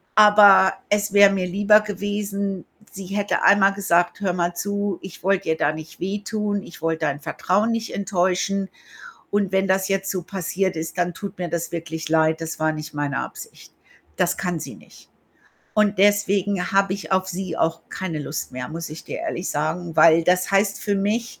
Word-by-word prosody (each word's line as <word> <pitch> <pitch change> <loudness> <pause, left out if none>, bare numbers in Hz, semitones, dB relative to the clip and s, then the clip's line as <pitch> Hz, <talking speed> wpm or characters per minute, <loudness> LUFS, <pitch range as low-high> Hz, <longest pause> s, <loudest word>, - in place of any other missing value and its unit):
Aber 205 -3 +7 0.2
es 205 0 0
wäre 200 -1 +7
mir 185 -2 -1
lieber 205 +3 +4
gewesen, 200 -2 -3 0.3
sie 195 -2 -8
hätte 200 +2 -1
einmal 200 0 +5
gesagt: 175 -3 +1
„Hör 195 -3 -1
mal 175 -1 -1
zu, 200 -1 -2
ich 185 -3 -11
wollte 195 0 +1
dir 160 - +1
da 150 - +2
nicht 155 0 -10
wehtun, 205 +2 -2
ich 170 - -13
wollte 165 -1 -1
dein 145 0 -2
Vertrauen 210 +10 0
nicht 230 0 -3
enttäuschen 195 0 0 0.6
und 200 -2 0
wenn 190 0 +1
das 190 0 +2
jetzt 195 0 -1
so 185 -2 -2
passiert 190 0 -2
ist, 165 +3 -5
dann 175 0 0
tut 200 +1 -8
mir 175 - -3
das 170 0 -3
wirklich 160 -1 -5
leid. 160 0 +2
Das 165 0 -5
war 155 0 +2
nicht 155 0 -7
meine 145 -1 -2
Absicht.“ - - -10 0.4
Das 180 - +1
kann 180 -2 -2
sie - - -7
nicht, - - -19 0.6
und 210 -2 +2
deswegen 200 -1 +2
habe 195 -1 +2
ich 195 -1 -7
auf 190 0 +2
sie 185 -2 -4
auch 165 0 0
keine 175 -5 -4
Lust 145 +1 -5
mehr, 125 0 -5
muss 165 0 -6
ich 155 - -9
dir - - -6
ehrlich 175 - -4
sagen, 160 +3 -3
weil 165 +1 +6
das 180 +1 +2
heißt 195 0 +1
für 205 - -1
mich, 215 +4 -2
190 Hz, 190 wpm, -22 LUFS, 170-200 Hz, 0.6 s, Aber